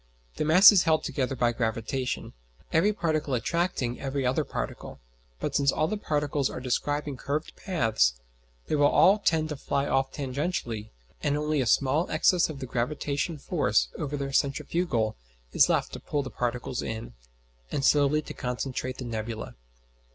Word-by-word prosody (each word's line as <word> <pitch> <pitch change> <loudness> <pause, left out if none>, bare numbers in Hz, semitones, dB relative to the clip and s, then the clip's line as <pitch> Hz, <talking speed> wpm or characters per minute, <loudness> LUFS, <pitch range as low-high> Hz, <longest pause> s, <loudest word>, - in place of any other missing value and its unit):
The - - 0
mass 180 +7 +9
is 200 -4 +5
held 160 -2 +2
together 135 -1 -2
by 120 -1 +2
gravitation, 115 +2 -2 0.4
every 175 +7 +4
particle 155 -8 -1
attracting 130 -2 -1
every 135 -1 -2
other 125 +1 +1
particle; - - -6 0.4
but - - -3
since 140 -1 +3
all 155 - 0
the 215 - -2
particles 145 -7 -1
are - - -6
describing 145 +3 -2
curved 145 +4 -3
paths, 110 - +1 0.5
they - - -1
will 150 +7 +5
tend 155 -1 +2
to 150 - -3
fly 140 0 -1
off 135 0 +1
tangentially, 130 - -3 0.3
and 145 0 +1
only 150 -1 0
a 125 - -1
small 140 - +2
excess 180 -3 +3
of 155 - -6
the 135 - -5
gravitation 145 +5 -2
force - - +1
over 145 0 -3
the 135 -1 -4
centrifugal 135 -4 0 0.4
is - - +5
left - - 0
to - - -5
pull 145 -1 -2
the 130 - -7
particles 125 +1 -2
in, 110 +1 -5 0.6
and 135 - -1
slowly 150 +1 +3
to - - -8
concentrate 130 +1 -4
the 130 - -6
nebula. 110 -1 -5
140 Hz, 160 wpm, -27 LUFS, 125-155 Hz, 0.6 s, mass